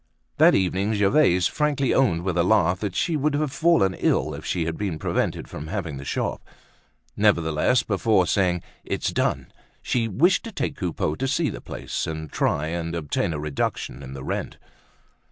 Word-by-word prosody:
That - - +6
evening 95 +3 +1
Gervaise 100 - +3
frankly 145 -3 +1
owned 90 -11 +2
with 95 -1 -1
a 85 - +3
laugh 90 -2 +3
that 100 -4 -3
she 165 - 0
would 150 0 +1
have 150 -1 0
fallen 160 - +3
ill 75 -4 0
if 75 +2 -8
she 85 -3 -1
had 80 0 -2
been 95 -6 -3
prevented - - -1
from 75 - -7
having 85 -6 -4
the 70 - -7
shop. - - -2 0.7
Nevertheless, 100 +2 +2
before 105 -2 +2
saying 90 -3 +1 0.2
"it's - - -2
done!" - - -1 0.3
she 115 -2 0
wished 155 - +3
to 230 - -6
take 155 - -3
Coupeau 85 - -2
to 135 +10 -2
see 150 +2 +1
the - - -8
place, - - -4
and 80 -1 -5
try 75 - 0
and 85 0 -3
obtain 85 0 -1
a 80 - -3
reduction 70 -2 -3
in 65 -1 -8
the 65 -1 -7
rent. - - -4
95 Hz, 180 wpm, -24 LUFS, 80-125 Hz, 0.7 s, That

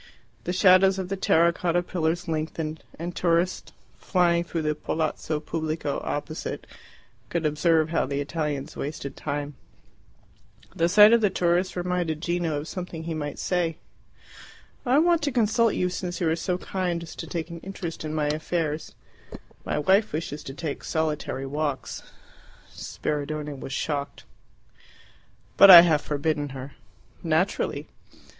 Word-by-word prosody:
The 180 - -1
shadows 185 +1 +5
of 190 -1 -4
the 195 - -1
terra 170 -3 +3
cotta 175 +1 0
pillars 175 0 -1
lengthened, 160 0 -3 0.2
and 170 +2 -5
tourists, 175 +1 0 0.3
flying 170 -2 +2
through 170 -1 -3
the 150 0 +1
Palazzo 155 0 -2
Pubblico 155 -2 -3
opposite, 150 +2 -4 0.6
could 170 -2 -2
observe 155 +1 +2
how 165 -4 0
the 140 +1 -2
Italians 145 -1 -3
wasted 140 -1 -5
time. 145 0 -4 1.2
The 170 +1 +2
sight 210 +4 +8
of 215 -5 +3
tourists 175 +1 +1
reminded 175 -3 -1
Gino 170 -2 -1
of 150 - -7
something 175 -3 -6
he 165 0 -4
might 145 -2 -4
say. 170 -3 -1 1.1
"I 255 +3 +4
want 340 +1 +4
to 290 -1 0
consult 230 -1 +2
you 180 - +1
since 180 0 -4
you 170 - +1
are - - +2
so 180 +2 -2
kind 180 -3 -2
as 165 - -10
to - - -6
take 170 0 -4
an 170 - -7
interest 180 -3 -6
in 155 - -4
my 150 -1 0
affairs. 155 +1 -2 0.7
My - - -2
wife 190 +7 +3
wishes 150 -1 -4
to 135 - -7
take 150 -2 -5
solitary 155 -4 -2
walks." 145 +1 -3 0.7
Spiridione 150 -1 -4
was 135 - -7
shocked. 140 0 -3 1.3
"But 200 - +9
I 175 -2 +13
have 160 -4 +3
forbidden 145 0 -1
her." 135 +2 -7 0.5
"Naturally." - - 0
165 Hz, 145 wpm, -25 LUFS, 150-180 Hz, 1.3 s, I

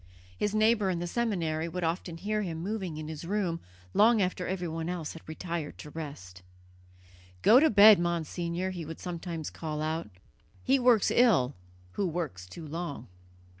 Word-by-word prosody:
His 210 - -1
neighbour 215 -2 +3
in 180 - 0
the 175 - -3
seminary 170 -7 -1
would 180 +1 -4
often 165 0 -2
hear 210 +4 -1
him 165 -4 -4
moving 190 -5 -3
in 155 0 -6
his 155 0 -6
room 180 -2 -1 0.3
long 225 +2 +5
after 180 -1 -1
everyone 170 -3 -3
else 175 -4 -4
had 165 - -10
retired 165 -1 -4
to 150 - -10
rest. 100 - -8 1.0
"Go 235 +4 +8
to 315 +2 +5
bed, 210 -1 +8
Monsignor," 170 +1 -2
he 175 -3 -5
would 160 +1 -8
sometimes 170 -3 -5
call 155 -2 -5
out. 155 -4 -2 0.5
"He 270 +1 +3
works 245 -4 +4
ill 190 - +4 0.4
who 195 - -1
works 155 - -4
too 165 - -9
long." 155 - -5
170 Hz, 165 wpm, -29 LUFS, 160-200 Hz, 1.0 s, Go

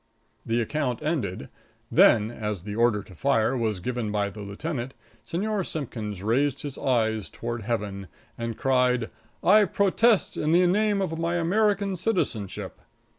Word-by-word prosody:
The 115 +1 0
account 125 0 -2
ended: 130 - -2 0.4
"Then, 110 -1 +5
as 105 -6 -4
the 105 +1 -5
order 115 -3 +2
to 95 - -15
fire 130 +3 +1
was 110 -5 -1
given 120 +1 -3
by 100 -1 0
the 110 - -11
lieutenant, 125 +6 -5 0.3
Señor 205 +3 -1
Simpkins 110 - -5
raised 135 +5 +1
his 145 -2 -5
eyes 110 -5 0
toward 120 0 -5
Heaven 100 -3 -3 0.3
and 115 -1 -4
cried: 125 -3 +2 0.3
'I 210 +3 +6
protest 200 +4 +2
in 155 +2 +1
the 180 +1 +5
name 205 +2 +2
of 165 -3 -3
my 170 +1 0
American 200 +3 +1
citizenship!'" 110 - -2
125 Hz, 145 wpm, -26 LUFS, 110-170 Hz, 0.4 s, I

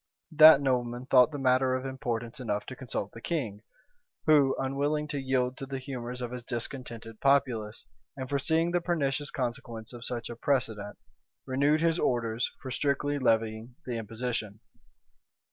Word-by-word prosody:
That 155 -2 +9
nobleman 125 -2 0
thought 130 +1 +6
the 145 - -4
matter 130 -1 +3
of 130 +1 -3
importance 120 -1 -4
enough 105 -4 -2
to 130 - -7
consult 120 -6 -4
the 115 - -11
king; 115 - -3 0.6
who, 145 -4 +5
unwilling 145 +3 -1
to 145 - -2
yield 130 -1 0
to 135 - -6
the 135 0 -4
humors 125 -2 -6
of 120 0 -4
a 125 - -5
discontented 115 -2 -6
populace, 120 -7 +1 0.3
and 130 -1 -4
foreseeing 160 +5 +1
the 175 0 +1
pernicious 145 -5 -1
consequence 120 -2 -4
of 120 -1 -9
such 120 -2 -3
a - - -6
precedent, 115 -6 -1 0.5
renewed 140 +4 +2
his 165 0 +2
orders 115 -1 0
for 130 - -5
strictly 145 +2 0
levying 115 -1 0
the 120 -2 -3
imposition. 115 -1 -4
130 Hz, 155 wpm, -29 LUFS, 115-140 Hz, 0.6 s, That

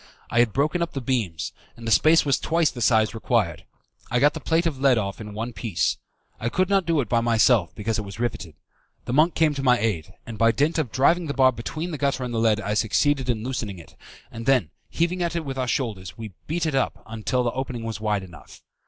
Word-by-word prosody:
I 120 - +2
had 120 -2 +4
broken 150 - 0
up 170 - -2
the 135 - -2
beams, 115 - -2 0.2
and 115 - -10
the - - 0
space 160 +8 +5
was 140 -2 +2
twice 165 -1 +1
the 120 - -8
size 110 -2 +3
required. 115 - -1 0.4
I 125 - +1
got 145 +3 +4
the - - -5
plate 165 +1 +1
of 150 -6 -1
lead 135 -3 +4
off 100 -1 -3
in 105 -1 -8
one 115 +3 -4
piece. 105 -9 -1 0.4
I 115 - -1
could 185 +8 0
not 195 -3 +2
do 165 -3 +2
it 120 - -4
by 115 +1 +2
myself, 115 -5 +3
because 110 +2 -2
it - - -3
was 100 +1 -9
riveted. 95 -9 -3 0.5
The 120 - -3
monk 155 +5 +4
came 160 -2 +3
to 140 - -4
my 125 -2 +4
aid, 105 -9 -2
and 110 -3 -8
by 115 0 +4
dint 155 +4 +1
of 135 -8 -2
driving 165 +6 +2
the 140 - -3
bar 130 -1 +5
between 155 +8 -5
the 150 - -5
gutter 140 -2 0
and 125 -1 -4
the 115 - 0
lead 110 -2 +3
I 105 0 -2
succeeded 130 +5 +1
in 110 -3 0
loosening 115 -6 -4
it, 85 - -14 0.4
and 115 0 -8
then, 125 - +3 0.2
heaving 175 +2 -1
at 170 -1 -1
it 165 -2 -2
with 135 -1 -4
our 130 - -1
shoulders, 110 -9 -3
we 110 -3 -8
beat 165 +2 -1
it 155 - -1
up 135 - -1 0.2
till 125 -1 +1
the 120 - 0
opening 130 -3 -4
was 115 -2 -5
wide 105 -2 0
enough. 85 -4 -14
125 Hz, 245 wpm, -24 LUFS, 110-145 Hz, 0.5 s, space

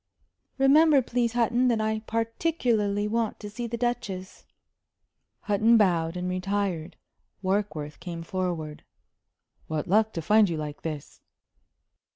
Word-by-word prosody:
"Remember, 280 +1 +5
please, 240 -1 0
Hutton, 240 +1 +2
that 235 -3 +2
I 220 0 0
particularly 225 -3 0
want 225 0 -1
to 210 -1 -8
see 235 +3 -4
the 235 +1 -4
Duchess." 200 -6 -3 1.0
Hutton 220 +2 +4
bowed 175 -5 +2
and 180 0 -3
retired. 185 -3 -2 0.5
Warkworth 185 -6 -2
came 170 -1 -6
forward. 170 -4 -3 0.8
"What 155 -1 -2
luck 215 +3 +3
to 165 - -3
find 210 +3 +5
you 165 - -2
like 150 -1 -6
this!" 155 -3 -6
205 Hz, 125 wpm, -27 LUFS, 175-230 Hz, 1.0 s, Remember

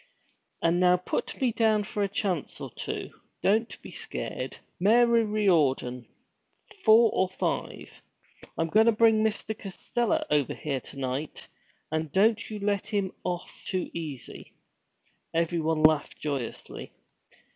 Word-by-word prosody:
And 170 +1 +3
now 180 0 +5
put 180 - -3
me 255 -3 +2
down 220 -2 +2
for 205 0 -4
a 200 - +2
chance 190 -6 -2
or - - -7
two; - - -5 0.3
don't 220 +4 +1
be - - -9
scared, 455 -2 -4 0.2
Mary 230 +4 +5
Riordan; 150 - +1 0.8
four 225 0 +7
or 185 - +1
five! 185 - -4 0.6
I'm 165 0 0
goin' 220 +5 +5
to 230 - +6
bring 220 0 +4
Mr. 220 0 -1
Costello 215 +3 -2
over 145 -4 +2
here 140 -3 -3
to - - -11
night, 135 +3 -4 0.4
and 160 -1 -2
don't 220 +5 +3
you 215 - -5
let 200 -1 -1
him 200 -4 -1
off 175 -1 -5
too 185 -1 -2
easy.' 150 -7 -7 0.8
Everyone 160 -2 +1
laughed 155 -2 +3
joyously. 140 -6 -5
190 Hz, 135 wpm, -28 LUFS, 155-220 Hz, 0.8 s, four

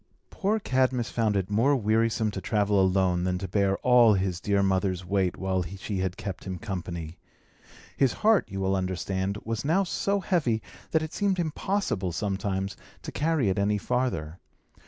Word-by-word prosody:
Poor 210 +3 0
Cadmus 130 - 0
found 110 -3 +1
it 95 +1 -2
more 125 +8 +3
wearisome 110 -1 +1
to 95 - -5
travel 100 0 +2
alone 95 -2 +2
than 90 0 0
to 95 +1 -4
bear 100 +1 +1
all 120 -4 +6
his 95 -2 -1
dear 100 -1 +2
mother's 95 -2 0
weight 95 -1 0
while 95 -1 0
she 95 +3 -5
had 95 -1 -2
kept 95 -3 -6
him 95 -2 -4
company. 85 -4 -6 0.8
His 135 -3 +3
heart, 220 -2 +4
you 95 - -5
will 95 0 +1
understand, 95 +1 -2
was 115 -1 -2
now 170 +7 +2
so 200 +2 0
heavy 160 - +1 0.3
that 160 -1 +1
it 155 - -6
seemed 200 -2 +1
impossible, 165 - -1
sometimes, 95 0 -2 0.3
to - - -6
carry 150 -7 +1
it 95 - 0
any 105 +1 +2
farther. 105 -9 -2
100 Hz, 170 wpm, -27 LUFS, 95-125 Hz, 0.8 s, all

